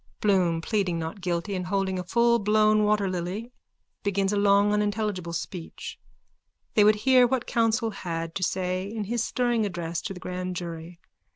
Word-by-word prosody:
_(Bloom, 180 Hz, -5 st, +2 dB
pleading 195 Hz, -5 st, 0 dB
not 165 Hz, +4 st, -5 dB
guilty 180 Hz, +2 st, -2 dB
and 180 Hz, -1 st, -3 dB
holding 190 Hz, -1 st, 0 dB
a -, -, -3 dB
fullblown 215 Hz, 0 st, +3 dB
waterlily, 200 Hz, +1 st, -1 dB, 0.5 s
begins 200 Hz, -1 st, 0 dB
a -, -, +1 dB
long 200 Hz, 0 st, +4 dB
unintelligible 210 Hz, -4 st, -1 dB
speech. 170 Hz, 0 st, -6 dB, 0.7 s
They 210 Hz, -, +5 dB
would 210 Hz, +1 st, +6 dB
hear 255 Hz, -2 st, +6 dB
what 255 Hz, -1 st, -1 dB
counsel 225 Hz, 0 st, +1 dB
had 165 Hz, -4 st, -4 dB
to 190 Hz, -, -4 dB
say 185 Hz, +1 st, -1 dB
in 220 Hz, -1 st, -3 dB
his 230 Hz, +3 st, -1 dB
stirring 240 Hz, -2 st, 0 dB
address 170 Hz, -4 st, -3 dB
to 195 Hz, -3 st, -5 dB
the -, -, -9 dB
grand 180 Hz, 0 st, -4 dB
jury. 170 Hz, 0 st, -7 dB
195 Hz, 160 wpm, -26 LUFS, 180-215 Hz, 0.7 s, would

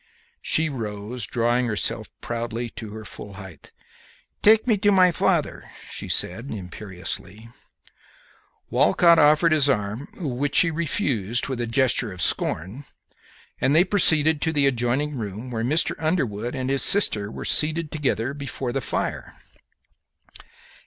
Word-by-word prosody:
She 160 Hz, +1 st, +2 dB
rose, 110 Hz, -3 st, -4 dB
drawing 120 Hz, +1 st, 0 dB
herself 105 Hz, -6 st, -2 dB
proudly 120 Hz, 0 st, -4 dB
to 110 Hz, -1 st, -8 dB
her 110 Hz, +1 st, -9 dB
full 100 Hz, 0 st, -9 dB
height. 95 Hz, -3 st, -12 dB, 0.7 s
"Take 220 Hz, +1 st, +5 dB
me 230 Hz, -4 st, +3 dB
to 205 Hz, +1 st, +2 dB
my 185 Hz, -2 st, +5 dB
father," -, -, -1 dB, 0.2 s
she -, -, -6 dB
said, 115 Hz, +10 st, -1 dB
imperiously. 95 Hz, +2 st, -6 dB, 1.2 s
Walcott 170 Hz, -1 st, +4 dB
offered 150 Hz, +3 st, +4 dB
his 145 Hz, -3 st, +4 dB
arm, 105 Hz, +2 st, -2 dB
which 145 Hz, -3 st, -3 dB
she 165 Hz, -, +4 dB
refused 135 Hz, -, -1 dB
with 130 Hz, -3 st, -3 dB
a 120 Hz, -, -2 dB
gesture 120 Hz, -2 st, +1 dB
of 90 Hz, -, -10 dB
scorn, 95 Hz, -, -1 dB, 0.8 s
and 140 Hz, -, +2 dB
they 170 Hz, -, +6 dB
proceeded 160 Hz, -6 st, +3 dB
to 160 Hz, -, 0 dB
the 145 Hz, -3 st, +2 dB
adjoining 135 Hz, +3 st, 0 dB
room, 110 Hz, +3 st, -6 dB
where 115 Hz, -1 st, -3 dB
Mr. 150 Hz, +7 st, +1 dB
Underwood 130 Hz, -, -2 dB
and 130 Hz, 0 st, -2 dB
his 135 Hz, -, +1 dB
sister 105 Hz, -, +4 dB
were -, -, -8 dB
seated 155 Hz, 0 st, +1 dB
together 135 Hz, -4 st, -1 dB
before 140 Hz, -3 st, -5 dB
the 135 Hz, -, -1 dB
fire. 110 Hz, -, -4 dB
125 Hz, 140 wpm, -23 LUFS, 110-155 Hz, 1.2 s, they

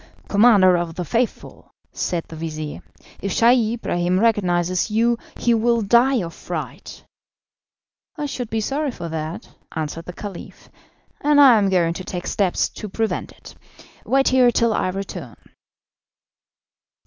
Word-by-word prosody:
"Commander 200 Hz, -4 st, +5 dB
of 170 Hz, -1 st, -3 dB
the 180 Hz, -, -4 dB
Faithful," 230 Hz, +8 st, -3 dB, 0.2 s
said 170 Hz, -2 st, -2 dB
the 160 Hz, -, -10 dB
vizir, 155 Hz, -2 st, -6 dB, 0.4 s
"if 200 Hz, -, -3 dB
Scheih 235 Hz, 0 st, +3 dB
Ibrahim 180 Hz, -5 st, -1 dB
recognises 185 Hz, -4 st, +1 dB
you 230 Hz, +2 st, +1 dB, 0.2 s
he 240 Hz, -, +2 dB
will 230 Hz, 0 st, +2 dB
die 240 Hz, +2 st, +3 dB
of 165 Hz, -1 st, -7 dB
fright." -, -, -7 dB, 1.1 s
"I 300 Hz, -, -3 dB
should 250 Hz, -5 st, -5 dB
be 220 Hz, 0 st, -1 dB
sorry 285 Hz, +6 st, -1 dB
for 170 Hz, -9 st, -6 dB
that," 160 Hz, +1 st, -5 dB, 0.3 s
answered 160 Hz, +1 st, -4 dB
the 180 Hz, -, -8 dB
Caliph, 200 Hz, -1 st, -9 dB, 0.5 s
"and 295 Hz, 0 st, +4 dB
I 270 Hz, -4 st, +8 dB
am 200 Hz, -1 st, +1 dB
going 170 Hz, -3 st, +2 dB
to 185 Hz, -, -7 dB
take 180 Hz, -1 st, -6 dB
steps 195 Hz, -4 st, 0 dB
to 210 Hz, -, -8 dB
prevent 225 Hz, +3 st, -2 dB
it. -, -, -14 dB, 0.5 s
Wait 270 Hz, 0 st, +2 dB
here 255 Hz, -1 st, +5 dB
till 235 Hz, -1 st, +2 dB
I 185 Hz, -, 0 dB
return." 195 Hz, +1 st, -6 dB
205 Hz, 145 wpm, -21 LUFS, 175-235 Hz, 1.1 s, I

